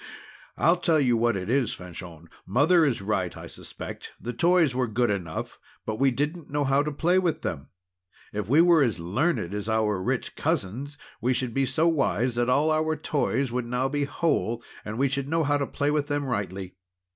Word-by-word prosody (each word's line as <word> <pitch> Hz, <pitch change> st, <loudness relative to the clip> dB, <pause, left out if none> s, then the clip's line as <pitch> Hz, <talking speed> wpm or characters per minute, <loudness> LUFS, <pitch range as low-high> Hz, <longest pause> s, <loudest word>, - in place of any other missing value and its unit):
I'll 170 Hz, +2 st, +4 dB
tell 165 Hz, -2 st, +2 dB
you 125 Hz, -4 st, +3 dB
what 115 Hz, -2 st, +2 dB
it 90 Hz, -, -5 dB
is, 125 Hz, 0 st, +1 dB
Fanchon, 85 Hz, -2 st, -10 dB, 0.2 s
Mother 155 Hz, -, +4 dB
is 125 Hz, -8 st, 0 dB
right, 95 Hz, -4 st, -1 dB
I -, -, -8 dB
suspect. -, -, -9 dB
The 120 Hz, -, -5 dB
toys 170 Hz, 0 st, +3 dB
were 125 Hz, -1 st, 0 dB
good 120 Hz, +1 st, +1 dB
enough, 85 Hz, -5 st, -4 dB, 0.3 s
but 110 Hz, 0 st, -3 dB
we 135 Hz, 0 st, +5 dB
didn't 150 Hz, +6 st, -3 dB
know 145 Hz, 0 st, 0 dB
how 135 Hz, +1 st, +3 dB
to 150 Hz, +1 st, -2 dB
play 175 Hz, +6 st, +2 dB
with 165 Hz, -4 st, -1 dB
them. 75 Hz, -6 st, -4 dB, 0.7 s
If 105 Hz, -1 st, -3 dB
we 150 Hz, +5 st, +6 dB
were 170 Hz, -2 st, +5 dB
as 115 Hz, -9 st, +1 dB
learned 100 Hz, -, 0 dB
as 105 Hz, +1 st, -3 dB
our 110 Hz, -3 st, +1 dB
rich -, -, -2 dB
cousins, 130 Hz, +10 st, -2 dB, 0.2 s
we 125 Hz, +3 st, +2 dB
should 125 Hz, -2 st, -2 dB
be 135 Hz, +1 st, +1 dB
so 165 Hz, +5 st, +2 dB
wise 130 Hz, -, +1 dB
that 120 Hz, +1 st, 0 dB
all 145 Hz, +5 st, +3 dB
our 155 Hz, 0 st, +1 dB
toys 140 Hz, -4 st, -1 dB
would 125 Hz, -1 st, -2 dB
now 125 Hz, +2 st, 0 dB
be 145 Hz, 0 st, 0 dB
whole; 130 Hz, -7 st, -1 dB, 0.2 s
and 110 Hz, +1 st, -5 dB
we 140 Hz, +2 st, +3 dB
should 140 Hz, +1 st, -2 dB
know 165 Hz, +1 st, +2 dB
how 145 Hz, 0 st, +2 dB
to 140 Hz, -, -1 dB
play 145 Hz, 0 st, 0 dB
with 150 Hz, -1 st, 0 dB
them 145 Hz, -1 st, -1 dB
rightly." 95 Hz, -6 st, -4 dB
130 Hz, 205 wpm, -26 LUFS, 110-150 Hz, 0.7 s, we